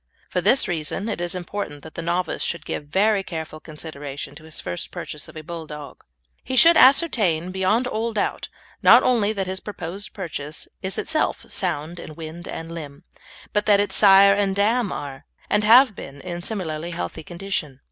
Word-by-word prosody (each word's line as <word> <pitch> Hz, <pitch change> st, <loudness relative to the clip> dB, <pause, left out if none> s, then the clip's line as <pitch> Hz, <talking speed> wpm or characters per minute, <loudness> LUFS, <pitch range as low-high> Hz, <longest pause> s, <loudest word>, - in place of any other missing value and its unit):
For -, -, 0 dB
this 270 Hz, -, +4 dB
reason 175 Hz, +4 st, -3 dB
it 205 Hz, -, -3 dB
is 175 Hz, +1 st, -1 dB
important 175 Hz, -5 st, -5 dB
that 160 Hz, -, -11 dB
the -, -, -5 dB
novice 175 Hz, +2 st, -1 dB
should 170 Hz, -, -2 dB
give 145 Hz, -, -5 dB
very 200 Hz, +5 st, +3 dB
careful 160 Hz, -4 st, -6 dB
consideration 145 Hz, -3 st, -7 dB
to 155 Hz, +2 st, -14 dB
his 160 Hz, -, -4 dB
first 90 Hz, -, -5 dB
purchase -, -, -7 dB
of -, -, -14 dB
a 155 Hz, -, -7 dB
Bulldog. 155 Hz, -4 st, -8 dB, 0.4 s
He 260 Hz, -, -3 dB
should 335 Hz, +6 st, +7 dB
ascertain 215 Hz, -, +4 dB
beyond 190 Hz, +6 st, +1 dB
all 230 Hz, -1 st, -2 dB
doubt, 210 Hz, -2 st, -2 dB, 0.3 s
not -, -, +8 dB
only 225 Hz, -5 st, +2 dB
that 195 Hz, -2 st, -2 dB
his 185 Hz, 0 st, -4 dB
proposed 195 Hz, -1 st, -6 dB
purchase 155 Hz, -6 st, -6 dB
is 190 Hz, 0 st, -3 dB
itself 315 Hz, -1 st, 0 dB
sound 155 Hz, +4 st, -2 dB
in 155 Hz, -, -9 dB
wind 165 Hz, +2 st, -8 dB
and 165 Hz, 0 st, -6 dB
limb, 150 Hz, -2 st, -8 dB, 0.5 s
but 210 Hz, 0 st, +1 dB
that 205 Hz, -1 st, +6 dB
its 205 Hz, -, 0 dB
sire 200 Hz, -1 st, +7 dB
and 200 Hz, -1 st, 0 dB
dam 215 Hz, +2 st, +2 dB
are, 140 Hz, 0 st, -7 dB, 0.2 s
and 210 Hz, -, +3 dB
have 235 Hz, +1 st, +7 dB
been, 140 Hz, -3 st, -9 dB
in 175 Hz, -1 st, -5 dB
similarly 170 Hz, -5 st, -3 dB
healthy 90 Hz, -, -5 dB
condition. 170 Hz, -5 st, -4 dB
175 Hz, 180 wpm, -23 LUFS, 155-205 Hz, 0.5 s, not